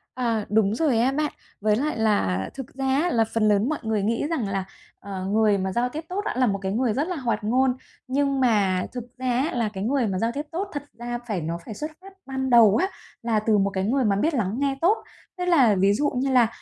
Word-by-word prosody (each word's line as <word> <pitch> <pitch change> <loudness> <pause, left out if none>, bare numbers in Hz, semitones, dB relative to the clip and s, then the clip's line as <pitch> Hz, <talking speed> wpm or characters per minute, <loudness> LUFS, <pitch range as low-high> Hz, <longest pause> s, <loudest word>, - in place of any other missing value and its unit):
À, 230 -4 -1
đúng 210 -1 +2
rồi 265 -4 +2
á 250 +3 +3
bạn. 300 +2 -1 0.3
Với 210 0 +3
lại 290 +5 -1
là 200 - +1
thực 270 -3 -8
ra 270 0 -4
á, 285 +7 +2
là 225 - +3
phần 225 -2 +2
lớn 210 +4 +3
mọi 310 - -2
người 220 -2 0
nghĩ 230 +7 0
rằng 265 -11 -1
là, 195 -1 -2 0.3
ờ, 190 -1 -6
người 210 +1 +3
mà 190 0 -2
giao 240 +5 0
tiếp 310 +5 -6
tốt 380 +3 -2
đã - - -1
là 255 -1 +3
một 200 -2 0
cái 190 0 -2
người 235 +1 +1
rất 290 +8 -1
là 365 - -2
hoạt 245 -7 -2
ngôn, 255 +4 +2 0.3
nhưng 275 +1 +1
mà 200 -7 +2
thực 245 -2 -5
ra 255 0 -4
á 265 +7 0
là 230 -3 0
cái 190 -1 -4
người 250 +1 +1
mà 190 -2 -1
giao 230 +3 0
tiếp 280 - -3
tốt 370 +5 -2
thật 290 -1 -4 0.2
ra 240 0 -4
phải 205 -6 -2
nó 165 +2 -3
phải 220 - -6
xuất 300 +9 -5
phát 390 +1 -13
ban 265 -1 -3
đầu 230 -4 +7
á 375 - +2 0.4
là 230 -2 +1
từ 215 0 +2
một 200 0 +2
cái 190 -1 -2
người 250 +5 +1
mà 200 -2 +2
biết 310 +12 +1
lắng 215 -6 -1
nghe 275 -1 +1
tốt. 390 +7 +4 0.4
Tức 360 - -2
là 270 - +5
ví 195 +1 +3
dụ 290 +8 +1
như 265 +2 0
là, 245 -3 +5
235 Hz, 260 wpm, -24 LUFS, 205-270 Hz, 0.4 s, đầu